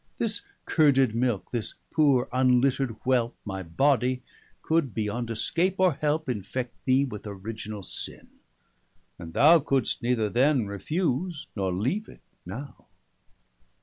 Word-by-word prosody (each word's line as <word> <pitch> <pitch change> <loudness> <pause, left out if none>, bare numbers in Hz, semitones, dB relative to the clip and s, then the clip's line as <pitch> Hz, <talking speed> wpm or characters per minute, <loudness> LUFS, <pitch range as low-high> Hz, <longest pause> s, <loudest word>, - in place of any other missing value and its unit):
This 225 -2 +2 0.2
curded 135 -7 +4
milke, 115 -3 -1
this 120 -3 -3 0.2
poore 140 -5 +3
unlittered 130 -1 +2
whelpe 125 -2 +1
165 - - -43
My 95 -2 -4
body, 125 - +1 0.4
could, 160 -7 +1
beyond 115 +2 -2
escape 170 - 0
or 185 -3 +4
helpe, 150 +2 -1
Infect 120 +2 -3
thee 130 +1 +4
with 105 -5 -7
Originall 105 +1 -6
sinne, - - -5 0.9
and 85 -2 -9
thou 165 +4 +7
Couldst 135 -4 0
neither 120 -3 +1
then 130 +2 +2
refuse, 155 - -2
nor 95 -3 -1
leave 130 - -1
it - - -15 0.3
now. - - -8
125 Hz, 130 wpm, -27 LUFS, 110-145 Hz, 0.9 s, thou